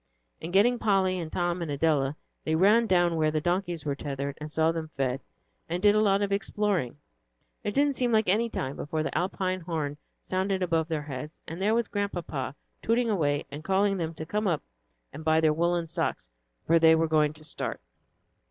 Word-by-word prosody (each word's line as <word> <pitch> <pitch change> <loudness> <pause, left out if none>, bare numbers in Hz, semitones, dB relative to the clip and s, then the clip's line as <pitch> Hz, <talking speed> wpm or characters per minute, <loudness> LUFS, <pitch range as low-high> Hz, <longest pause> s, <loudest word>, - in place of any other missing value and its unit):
And 165 - -5
getting 230 +6 +4
Polly 190 -3 +2
and 160 -2 -5
Tom 175 0 -1
and 165 - -3
Adela, 145 -1 +1 0.3
they 160 - 0
ran 210 +7 +5
down 175 -3 +3
where 155 -1 +3
the 155 0 0
donkeys 175 -1 -1
were 145 - 0
tethered 140 0 -4
and 150 0 -6
saw 160 +1 +3
them 165 -1 -4
fed, 135 0 0 0.5
and 175 +2 -1
did 205 +2 +5
a 215 - +3
lot 200 -1 +3
of 200 - -1
exploring; 200 - 0 0.7
and - - -1
it 205 - -6
didn't 285 0 +3
seem 245 -3 +1
any 220 +2 +2
time 135 -9 -3
before 155 +2 -2
an 155 - -2
Alpine 185 0 -1
horn 160 -4 -3 0.3
sounded 190 0 -1
above 165 -2 +1
their 160 -3 -2
heads, 145 +1 -7
and 165 +3 -6
there 215 +3 +3
was 235 -2 +1
Grandpapa, 175 -10 -3 0.3
tooting 230 0 +1
away 145 -7 +1
and 145 +2 -7
calling 195 +2 +2
them 165 -2 -3
to 155 - -6
come 210 +5 -1
up 165 -5 0 0.5
and 155 - -8
buy 160 0 +3
their 155 -1 +3
woollen 170 +1 +1
socks; 160 - -2 0.4
for 165 +1 +4
they 160 0 +7
were 165 0 +2
going 155 -1 +3
to 155 0 -12
start. 150 - -4
170 Hz, 200 wpm, -28 LUFS, 155-195 Hz, 0.7 s, they